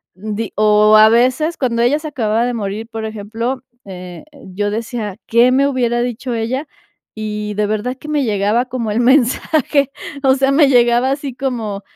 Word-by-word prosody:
di 215 +2 -5
o 215 0 +4
a 215 0 +7
veces 255 +8 +2
cuando 235 -3 0
ella 285 +5 +2
se 310 - -7
acababa 225 -3 0
de 245 - -2
morir, 215 0 -4
por 225 -1 -6
ejemplo, 225 +4 -4 0.2
eh, 180 -2 -9 0.3
yo 205 0 0
decía: 220 -2 -4
"¿Qué 235 +2 +4
me 275 +2 +3
hubiera 240 -3 0
dicho 245 +1 -3
ella?". 255 +6 -3 0.5
Y 210 -1 -4
de 210 - 0
verdad 215 +4 -2
que 300 - -9
me 295 -2 0
llegaba 210 +3 +1
como 245 -4 -4
el 220 - 0
mensaje, 275 +2 +2 0.3
o 265 0 +4
sea, 270 0 +1
me 285 0 +5
llegaba 240 +1 +3
así 275 -2 -4
como: 225 -7 -3
235 Hz, 175 wpm, -17 LUFS, 215-260 Hz, 0.5 s, a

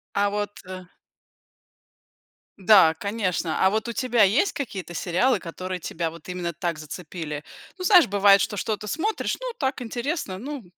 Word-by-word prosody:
А 205 0 +2
вот, 205 0 -2
э 185 0 -8 1.7
Да, 190 -4 +6
конечно, 190 -5 -1
а - - +6
вот 220 +2 -1
у 235 - -3
тебя 245 -1 +1
есть 240 - +3
какие-то 195 -10 -5
сериалы, 185 +10 +1
которые 185 +2 -6
тебя 165 0 -3
вот 170 +1 -13
именно 175 -2 -3
так 170 0 -3
зацепили? 155 -1 -7 0.4
Ну, - - -4
знаешь, 365 -3 +7
бывает, 200 0 +5
что 205 - -2
что-то 210 +2 -3
смотришь, 370 - -2
ну, - - -4
так 265 -2 -2
интересно, 240 - -3
ну, 275 +3 -6
200 Hz, 155 wpm, -24 LUFS, 180-240 Hz, 1.7 s, знаешь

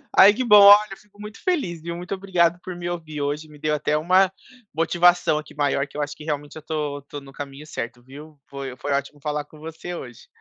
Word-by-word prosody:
Ai 200 +2 +8
que 255 +3 -2
bom 210 -3 +7
olha, 205 0 +7
fico 210 -1 -24
muito 210 +1 -10
feliz 190 - -1
viu, 170 +1 -5
muito 175 +2 -6
obrigado 180 -3 +1
por 185 -1 -6
me 175 0 -5
ouvir 155 -4 -5
hoje, 145 +2 -3
me 150 -1 -16
deu 155 0 0
até 150 +1 0
uma 185 +4 +3 0.4
motivação 170 0 +3
aqui 150 0 -8
maior 140 -1 0
que 145 - -12
eu - - -1
acho 145 0 -4
que 150 - -12
realmente 145 -1 -4
eu - - -7
estou 150 -2 -3
estou 140 +1 -9
no 135 0 -14
caminho 140 +2 -8
certo 120 -3 -6
viu. 145 +3 -13
Foi 135 -2 -7
foi 145 - -4
ótimo 140 +1 -3
falar 150 0 -3
com 150 0 -17
você 160 +3 -8
hoje. 120 -7 -10
155 Hz, 230 wpm, -23 LUFS, 145-175 Hz, 0.4 s, Ai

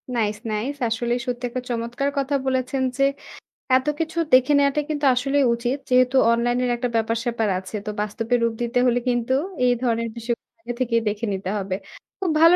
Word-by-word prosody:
Nice, 215 -2 0
nice. 225 +7 -2
আসলেই 240 +2 0
সত্যি 250 0 -3
একটা 255 +1 -4
চমৎকার 240 +3 -1
কথা 280 +1 0
বলেছেন 260 0 0
যে 275 - +3 0.7
এত 260 +2 -4
কিছু 325 +1 -3 0.2
দেখে 255 +2 +6
নেওয়াটাই 285 +1 +2
কিন্তু 295 -1 -1
আসলেই 275 +2 +2
উচিত। 240 +3 -1
যেহেতু 255 +1 +4 0.2
অনলাইনের 240 +1 +1
একটা 245 +1 -2
ব্যাপার-স্যাপার 230 0 0
আছে, 190 +3 -9
তো - - -3
বাস্তবের 225 +3 0
রূপ 230 -1 +1
দিতে 240 +1 +1
হলে 245 0 +3
কিন্তু 240 +1 0 0.3
এই 245 - +5
ধরনের 230 -1 0
বিষয় 235 +1 -1 0.3
আগে 240 - -5
থেকেই 230 -2 +1
দেখে 210 +2 -3
নিতে 190 -1 -4
হবে। 190 -2 -2 0.4
খুব 380 - -1
ভালো 335 +2 +8
245 Hz, 175 wpm, -23 LUFS, 230-260 Hz, 0.7 s, ভালো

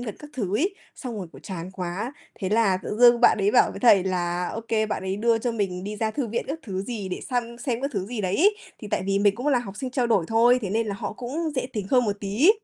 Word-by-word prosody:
Nhật 245 - -6
gần 215 - -5
các 295 0 -11
thứ 205 -5 -1
ấy, 375 - 0 0.2
xong 245 -5 -6
rồi, 185 - -5
kiểu, 135 - -13
chán 180 -1 -6
quá, 185 +7 -4 0.2
thế 190 - -4
là 210 -2 +3
tự 210 - -4
dưng 240 0 +7
bạn - - +6
đấy 200 +1 +2
bảo 245 - +5
với - - -8
thầy 205 -7 +6
là, 175 -1 -1
OK 225 0 -6 0.2
bạn - - -2
ấy 190 +1 -2
đưa 230 +2 +2
cho 240 +1 -1
mình 190 -4 -2
đi 210 +1 -5
ra 220 0 0
thư 270 +1 -2
viện 230 +1 -2
các 295 +4 -3
thứ 190 -4 -4
gì 210 -3 -5
để 180 - -4
săn 235 -1 -2
xem 245 -2 -2
các 275 - -1
thứ 195 -4 -2
gì 230 0 -4
đấy 185 -1 0
ấy. 410 +5 +4 0.2
Thì 210 - -8
tại - - -1
vì 195 0 +2
mình 205 -1 +3
cũng 245 +6 -5
là 280 -4 +4
học 205 -5 -7
sinh 255 +4 -4
trao 250 -1 0
đổi 210 -7 +2
thôi, 235 +3 +5
thế 195 - -3
nên 225 +2 0
là 200 - -2
họ - - -4
cũng 275 +9 -3
dễ 255 - 0
tính 210 -4 -3
hơn 250 -2 +4
một 205 -2 -1
tí. 210 - +4
220 Hz, 295 wpm, -25 LUFS, 195-245 Hz, 0.2 s, dưng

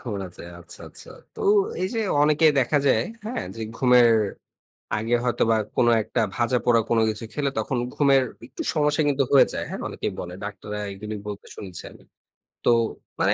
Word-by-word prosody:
ঘুম 115 -5 -5
আছে। 90 - -12 0.2
আচ্ছা, 85 - -11
আচ্ছা। - - -9 0.2
তো - - -10 0.4
এই 185 - 0
যে, 230 - -1 0.2
অনেকে 155 +2 +4
দেখা 135 +3 +2
যায়, 115 -4 +3 0.2
হ্যাঁ, 240 +4 -3
যে, 115 - -5
ঘুমের 125 -2 +5 0.9
আগে 115 +3 0
হয়তোবা 115 -2 +2 0.2
কোন 120 - +4 0.2
একটা 120 - -2 0.2
ভাজাপোড়া 120 -1 +2
কোন 115 - +3
কিছু 110 +1 -6
খেলে 140 -2 0
তখন 130 -4 -1 0.2
ঘুমের 140 -2 +4 0.2
একটু 130 - -7
সমস্যা 150 0 +2
কিন্তু 140 -1 +2
হয়ে 140 - +7
যায়। - - -2
হ্যাঁ, - - -5
অনেকেই - - -4
বলে। 90 0 -7
ডাক্তাররা 105 +1 -6
এগুলি 105 +2 -6
বলতে 100 -1 -7
শুনেছি 95 -4 -7
আমি। - - -17 0.6
তো - - +5 0.5
মানে - - +4
120 Hz, 170 wpm, -24 LUFS, 110-140 Hz, 0.9 s, হয়ে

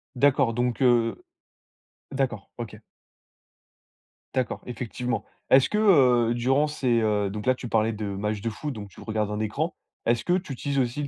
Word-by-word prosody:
D'accord. 135 -2 +3
Donc, 120 0 -1
heu 120 - +3 0.9
d'accord, 130 -6 -2
OK. 110 -3 -6 1.6
D'accord, 130 -2 -1
effectivement. 120 -2 -3 0.3
Est-ce 130 0 +6
que, 210 - 0
heu, 125 - +5
durant 135 +5 +2
ces 125 -5 +1
heu, 105 -2 +1
donc 105 +1 -6
là 130 - +4
tu 125 -1 -7
parlais 110 0 +2
de 105 0 -4
matchs 100 +1 -2
de 115 - -1
foot, 145 +5 -5
donc 100 -3 -8
tu - - -16
regardes 110 -2 -2
un 105 0 -3
écran. 140 - -2 0.3
Est-ce 120 0 +2
que 175 - +2
tu 180 -6 -1
utilises 140 +2 -2
aussi 130 +3 -1
le - - -3
120 Hz, 175 wpm, -26 LUFS, 110-135 Hz, 1.6 s, Est-ce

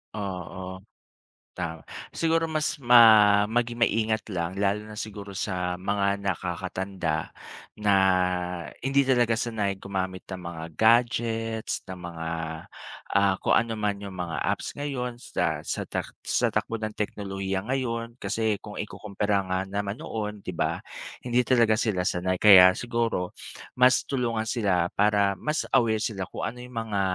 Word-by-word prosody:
Oo, 95 -1 -5 0.8
ta 80 -2 -4 0.3
siguro 165 0 +1
mas 155 -1 0
ma 110 -4 +7
maging 120 +1 -1
maingat 110 0 0
lang 85 +2 -3
lalo 100 +2 0
na 105 - -9
siguro 100 -2 -6
sa 90 -2 -2
mga 100 +1 0
nakakatanda 95 -2 -3 0.5
na 105 -1 +3 0.9
hindi 135 +1 +2
talaga 120 -3 +3
sanay 105 -4 -1
gumamit 95 -1 -4
ng 95 -2 -6
mga 85 -1 -6
gadgets, 115 -1 +2
ng 95 -1 -7
mga, 80 -1 -5 0.9
ah, 100 -1 +4
kung - - +1
ano 115 -1 +1
man 100 -1 -1
yung 95 -2 -7
mga 85 -3 -3
apps - - -2
ngayon 125 -4 -3
sa - - -1
sa - - -3
tak - - -4
sa - - +2
takbo 115 - -1
ng 110 0 -2
teknolohiya 95 -2 -3
ngayon. 115 -2 -2
Kasi 105 +1 0
kung 105 - -10
ikukumpara 100 -1 -2
nga 95 0 0
naman 100 +1 -3
noon 105 -2 -4
di 90 - -4
ba, 85 - -1 0.4
hindi 125 0 +1
talaga 115 -4 +4
sila 105 -6 0
sanay. 95 0 0
Kaya 95 -3 +9
siguro 115 -6 -1 0.5
mas 125 +1 +5
tulungan 115 -4 -1
sila 95 -7 +1
para 100 -2 +2
mas 150 - -1
aware 110 -4 +3
sila 95 -5 -2
kung - - -6
ano 125 - -11
yung 125 0 -10
mga 105 -3 -1
105 Hz, 145 wpm, -26 LUFS, 95-115 Hz, 0.9 s, Kaya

